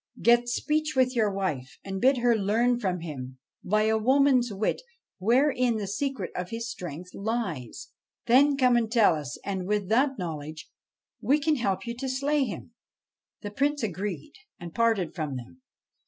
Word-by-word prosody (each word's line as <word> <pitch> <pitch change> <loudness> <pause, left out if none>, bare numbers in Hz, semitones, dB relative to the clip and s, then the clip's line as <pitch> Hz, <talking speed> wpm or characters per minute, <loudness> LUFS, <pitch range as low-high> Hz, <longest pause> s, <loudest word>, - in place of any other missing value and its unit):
Get 240 0 +4
speech 305 +4 -1
with 255 -1 +2
your 215 -3 +2
wife, 155 -10 -3
and 195 -1 -5
bid 265 +2 +4
her 240 -1 +3
learn 230 +4 +1
from 185 -5 -2
him, 130 -6 -7 0.3
by 215 +3 +2
a 220 0 +2
woman's 260 0 +3
wit, 205 +2 -1 0.4
wherein 245 +2 +2
the 210 - -3
secret 210 0 -3
of 180 0 -4
his 230 +1 -4
strength 180 -4 -7
lies. 195 - -4 0.4
Then 275 +4 +5
come 250 -2 +4
and 230 -2 +1
tell 225 -7 +5
us; 145 -3 -5
and, 190 -2 -3
with 205 -2 -1
that 265 +4 +2
knowledge, 155 -3 -6 0.5
we 290 +3 +3
can 305 0 +1
help 200 -5 -1
you 235 0 -4
to 265 +1 -3
slay 275 +2 +1
him.' 235 +1 -7 0.7
The 205 - -5
Prince 285 +4 0
agreed, 190 -5 -4 0.3
and 170 -1 -8
parted 225 -7 +1
from 155 -5 -4
them. 125 - -11
220 Hz, 170 wpm, -27 LUFS, 180-255 Hz, 0.7 s, Then